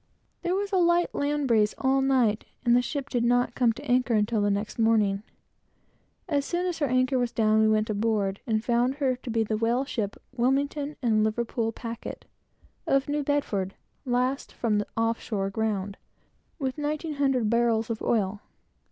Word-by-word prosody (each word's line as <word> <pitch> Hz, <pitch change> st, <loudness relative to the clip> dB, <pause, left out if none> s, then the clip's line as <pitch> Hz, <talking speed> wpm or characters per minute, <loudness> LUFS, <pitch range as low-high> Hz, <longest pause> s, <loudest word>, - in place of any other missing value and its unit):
There 355 Hz, +1 st, 0 dB
was 400 Hz, +1 st, -2 dB
a 385 Hz, -, +2 dB
light 345 Hz, 0 st, +3 dB
land 290 Hz, 0 st, 0 dB
breeze 215 Hz, -3 st, +3 dB
all 270 Hz, 0 st, +2 dB
night, 250 Hz, -5 st, +2 dB, 0.2 s
and 240 Hz, 0 st, +5 dB
the 245 Hz, -, +5 dB
ship 275 Hz, +2 st, -4 dB
did 245 Hz, -4 st, -1 dB
not 245 Hz, +1 st, +2 dB
come 240 Hz, -2 st, +3 dB
to 275 Hz, -, -10 dB
anchor 250 Hz, -2 st, +2 dB
until 210 Hz, +1 st, +1 dB
the 205 Hz, -, +2 dB
next 205 Hz, +3 st, -2 dB
morning. 215 Hz, -3 st, +3 dB, 1.1 s
As 290 Hz, -4 st, +1 dB
soon 345 Hz, +5 st, -2 dB
as 355 Hz, -2 st, -2 dB
her 290 Hz, -, +1 dB
anchor 255 Hz, +1 st, +2 dB
was 245 Hz, -1 st, 0 dB
down, 220 Hz, -1 st, +3 dB
we 220 Hz, -, +4 dB
went 215 Hz, 0 st, +2 dB
aboard, 205 Hz, -2 st, 0 dB
and 220 Hz, -1 st, 0 dB
found 245 Hz, +2 st, +2 dB
her 270 Hz, -3 st, +1 dB
to 255 Hz, -, -9 dB
be 225 Hz, -1 st, +1 dB
the 215 Hz, 0 st, -1 dB
whaleship, 230 Hz, -2 st, -1 dB, 0.2 s
Wilmington 280 Hz, +4 st, 0 dB
and 215 Hz, -3 st, +3 dB
Liverpool 225 Hz, +1 st, -1 dB
Packet, 230 Hz, 0 st, -7 dB, 0.6 s
of 275 Hz, 0 st, +2 dB
New 295 Hz, 0 st, 0 dB
Bedford, 210 Hz, -10 st, -1 dB, 0.3 s
last 255 Hz, +1 st, -1 dB
from 215 Hz, -3 st, 0 dB
the 205 Hz, -, -3 dB
"off 225 Hz, 0 st, +1 dB
shore 195 Hz, -3 st, -2 dB
ground," 200 Hz, -2 st, -2 dB, 0.6 s
with 270 Hz, -2 st, -3 dB
nineteen 300 Hz, +2 st, -2 dB
hundred 270 Hz, -5 st, +1 dB
barrels 235 Hz, -1 st, +2 dB
of 220 Hz, -, -4 dB
oil. 205 Hz, -3 st, 0 dB
240 Hz, 180 wpm, -27 LUFS, 220-275 Hz, 1.1 s, and